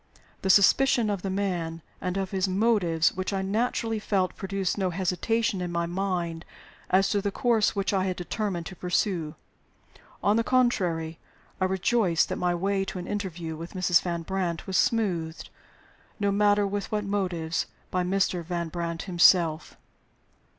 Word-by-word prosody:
The 190 - -2
suspicion 215 +4 +5
of 200 -3 -2
the 195 - -3
man 175 -4 -2 0.2
and 180 0 -2
of 190 -1 -2
his 190 -1 0
motives 185 -5 +2
which 185 +2 -3
I 195 -1 -1
naturally 225 +2 -1
felt 195 -3 0
produced 195 -1 -2
no 190 -2 0
hesitation 190 +4 0
in 175 -1 -3
my 170 0 0
mind 175 -2 -2 0.5
as 195 +1 +3
to 200 0 +1
the 200 - -1
course 230 -1 +1
which 200 0 0
I 190 -1 +1
had 185 -1 -1
determined 180 -1 -3
to 185 - -8
pursue. 180 -3 -1 0.9
On 205 +2 +3
the 230 - +2
contrary, 180 -11 +1 0.4
I 185 - +2
rejoiced 190 -1 +2
that - - -2
my 175 -1 0
way 195 +2 0
to 190 - -6
an 180 - -5
interview 175 -6 -4
with 165 +4 -9
Mrs. 180 -2 +3
Van 170 -2 -3
Brandt 180 -2 -2
was 190 - -4
smoothed, 175 -7 0 0.7
no 200 -1 +1
matter 205 0 +3
with 200 0 -3
what 210 -1 0
motives, 180 -5 -1 0.2
by 185 - +1
Mr. 185 -1 0
Van 170 0 -3
Brandt 170 0 -4
himself. 170 -3 +3
190 Hz, 165 wpm, -27 LUFS, 175-200 Hz, 0.9 s, suspicion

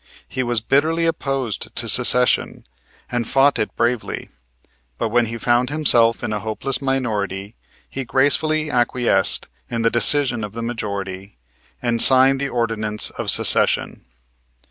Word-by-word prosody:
He 130 - -4
was 120 -3 -1
bitterly 155 +7 0
opposed 135 -8 -3
to - - -1
Secession - - +2 0.5
and 120 -2 -2
fought 135 +1 +2
it 110 - -3
bravely; 120 -1 -3 0.7
but 115 - -2
when 120 +1 +1
he 115 +1 -6
found 120 +2 0
himself 120 -7 +1
in 110 -3 -3
a 105 - -3
hopeless 110 +6 -3
minority 105 -7 -3 0.3
he 135 - -6
gracefully 150 +5 +1
acquiesced 120 -1 0 0.2
in 115 -1 -3
the 115 - +2
decision 120 -1 +1
of 105 -1 -7
the 115 +1 -6
majority 100 - -6 0.5
and 120 -1 +1
signed 135 +1 +6
the 140 0 -3
ordinance 110 -3 -3
of - - -4
Secession. - - +3
120 Hz, 140 wpm, -19 LUFS, 110-135 Hz, 0.7 s, signed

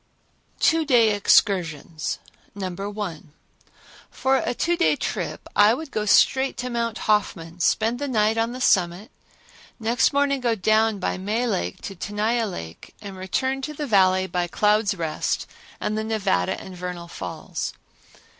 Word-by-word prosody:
Two 325 0 +3
Day 240 -7 +4
Excursions 170 -7 +1 0.4
No. 190 -2 -4 0.2
1. 180 -8 -6 0.8
For 265 0 +1
a 245 - -1
two 345 +7 +1
day 340 - +3
trip - - -4
I 210 +3 +6
would 310 +1 -8
go 215 -1 -2
straight 265 +6 +4
to 250 0 -4
Mount 230 -2 -1
Hoffman, 180 -5 0
spend 225 +6 +1
the 285 - -2
night 220 -3 +2
on 225 +1 0
the 255 +1 -7
summit, 185 0 +2 0.7
next 230 +2 +2
morning 280 -1 +1
go 235 -2 +1
down 215 +2 +2
by 185 - -2
May 215 +6 -1
Lake 90 - -2
to 195 - -5
Tenaya 215 +4 -1
Lake 85 - -9
and 200 -2 -8
return 260 +9 -2
to 300 +2 -5
the 295 - -3
Valley 190 -5 +4
by 180 -2 -1
Cloud's 210 +2 +2
Rest 165 -3 -2 0.3
and 210 - -2
the 220 - -1
Nevada 205 - 0
and 190 - -10
Vernal 180 -1 -6
Falls. - - -5
215 Hz, 155 wpm, -24 LUFS, 185-240 Hz, 0.8 s, I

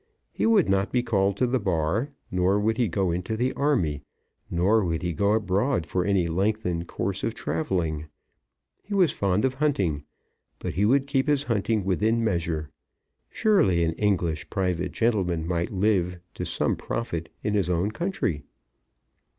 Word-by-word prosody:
He - - 0
would 220 -6 +4
not 95 +1 +1
be 125 -1 +1
called 100 -4 +1
to 130 - +2
the 125 +1 +1
Bar, 95 - 0 0.2
nor 90 +2 +2
would 110 +2 +1
he 120 - +2
go 95 0 0
into 90 +6 -2
the 125 +3 0
army, 90 - 0 0.5
nor 100 +6 +3
would 85 -2 -2
he 85 -1 -1
go 100 +5 +2
abroad 105 - +1
for 90 +3 -1
any 95 -2 +2
lengthened 90 -1 -1
course - - -3
of - - -1
travelling. 80 -1 -2 0.7
He 200 +1 -5
was 185 -5 +4
fond 100 +2 +1
of 130 - +1
hunting, 100 - 0 0.5
but - - -4
he 100 - +1
would 135 +5 +3
keep 135 0 0
his 145 -2 +2
hunting 110 -4 0
within 110 +5 +1
measure. 85 -7 -1 0.6
Surely 100 - +3
an 80 0 +1
English 85 -5 0
private 90 -2 -1
gentleman 90 -8 0
might 85 -1 -1
live 95 -3 +1 0.2
to - - -4
some - - 0
profit 85 -9 -4
in 105 - 0
his 100 -4 +1
own 90 +4 +1
country! 115 - -2
100 Hz, 165 wpm, -26 LUFS, 85-115 Hz, 0.7 s, would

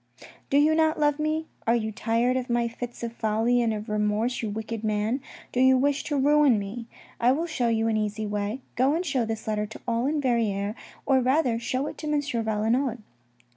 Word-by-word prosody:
" - - -23
Do 280 - +3
you 300 +2 +5
not 315 0 +2
love 295 0 +2
me? 310 +1 0 0.2
Are 230 - +4
you 220 -2 -1
tired 230 +4 +1
of 255 0 -2
my 240 0 +1
fits 240 +1 -7
of 235 -1 -3
folly 225 +2 +1
and 230 -1 +1
of 215 0 -4
remorse, 210 +3 0
you 220 - -2
wicked 220 +1 -5
man? 215 +4 0 0.3
Do 250 - -1
you 260 0 +6
wish 280 +2 +1
to 295 - -1
ruin 290 -3 +4
me? 210 +4 -5 0.3
I 240 +2 +4
will 315 +6 0
show 315 -8 -1
you 225 -1 +1
an 220 -1 +1
easy 215 0 -2
way. 210 +4 -3
Go 265 +5 +3
and 350 +2 -1
show 270 -7 0
this 220 0 -4
letter 210 -1 -1
to 215 - -11
all 235 +4 +1
Verrieres, 230 -8 0 0.3
or 270 -1 +4
rather 255 -2 +2
show 255 +3 -2
it - - -7
to 305 -1 -3
M. 300 - +2
Valenod. 230 -1 -1
235 Hz, 210 wpm, -26 LUFS, 220-275 Hz, 0.3 s, you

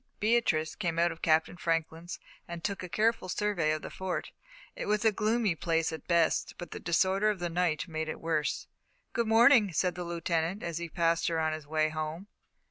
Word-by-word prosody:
Beatrice 210 -8 +2
came 170 -5 -2
out 170 +1 +3
of 165 - -10
Captain 160 +2 +2
Franklin's 165 0 -2 0.3
and 170 -1 -7
took 200 -1 -2
a 180 - -6
careful 215 -1 +1
survey 200 -6 0
of 155 0 -1
the - - -6
Fort. 180 -5 -4 0.4
It - - -5
was 210 +2 +1
a 220 - +6
gloomy 215 -1 +1
place 165 0 0
at 160 - -8
best, 170 -2 +2
but 175 - -8
the - - -6
disorder 190 +5 +2
of 210 - 0
the 175 -1 -3
night 175 -1 0
made 160 -1 -3
it - - -5
worse. 160 -2 -1 0.5
"Good 235 -1 0
morning," 225 -2 +6
said 180 +3 +1
the 180 - -5
Lieutenant, 170 +2 -2
as 170 -1 -3
he 170 -1 -5
passed 165 0 +1
her 165 -1 0
on 160 0 +1
his 155 -2 -7
way 155 0 +1
home. 155 +4 -4
170 Hz, 205 wpm, -30 LUFS, 160-195 Hz, 0.5 s, a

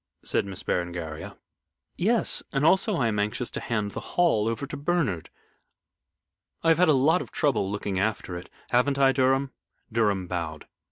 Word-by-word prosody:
said - - +1
Miss 95 -2 -7
Berengaria. 85 -3 -3 0.6
"Yes. 225 +5 +1
And 135 0 0
I - - +7
am - - +7
also 190 0 +1
anxious 110 0 0
to - - -4
hand 105 -3 -2
the - - -5 0.2
Hall 155 -12 +3
over 115 +5 -2
to 140 - -7
Bernard. 145 - -1 1.3
I 165 - +3
have 165 - +4
had 180 -2 +5
a - - +6
lot 155 +7 +3
of - - -8
trouble 135 -9 +1
looking 100 -2 -2
after 100 -3 -1
it. 90 +1 -8 0.2
Haven't 130 +3 +3
I, 135 -1 +5
Mr. - - -4
Durham?" 135 +1 +2 0.4
Durham 105 -5 +1
bowed. 85 -4 -4
115 Hz, 175 wpm, -26 LUFS, 95-145 Hz, 1.3 s, I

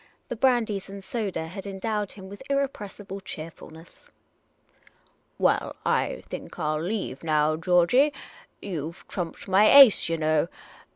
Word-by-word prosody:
The - - -3
brandies 225 -6 +1
and 195 0 -9
soda 195 -5 -3
had 190 +4 -8
endowed 205 +1 -3
him 190 -2 -11
with 200 +4 -11
irrepressible 210 -8 -3
cheerfulness. 160 -2 -11 0.6
" - - -34
Well, - - +1
I - - 0
think - - -8
I 155 -3 -1
'11 155 +2 -2
leave 200 -10 -4
now, 155 -1 +2
Georgey. 180 - +3 0.5
You 165 -5 -4
've - - -19
trumped 175 0 -5
my 195 +3 +5
ace, 275 -11 +8
yah 165 - 0
know. 155 0 +1
190 Hz, 140 wpm, -26 LUFS, 165-210 Hz, 0.6 s, ace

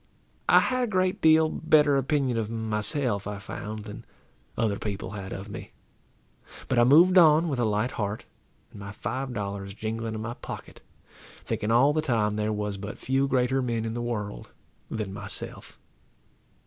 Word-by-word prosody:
I - - +7
had 255 0 0
a - - 0
great 185 -2 0
deal 160 0 +6
better 150 -3 +3
opinion 135 -2 +1
of 110 -2 -1
myself, 110 0 -1
I 105 -1 -4
found, 105 +1 -7
than 105 - -8 0.5
other 105 -3 0
people 100 -2 -4
had 100 -2 -7
of 95 +2 -6
me; 100 - -9 0.9
but 130 - +2
I - - +7
moved 170 +9 +7
on 160 0 +6
with 135 -4 -2
a 120 - +2
light 105 +3 0
heart, 105 0 -3 0.5
and - - -12
my 100 0 -7
five 130 +5 -4
dollars 100 -3 -5
jingling 110 +1 -4
in 110 - -4
my 120 +2 -4
pocket, - - -9 0.6
thinking 105 - -2
all 125 +6 +5
the 155 - +1
time 110 -7 +1
there 105 0 -1
was 105 -1 -3
but 105 +2 -7
few 135 +1 +1
greater 130 0 +1
men 115 -3 -1
in 110 - -3
the 120 - -3
world 105 -4 -4 0.4
than 105 -3 -4
myself. 105 0 -7
115 Hz, 175 wpm, -27 LUFS, 105-135 Hz, 0.9 s, I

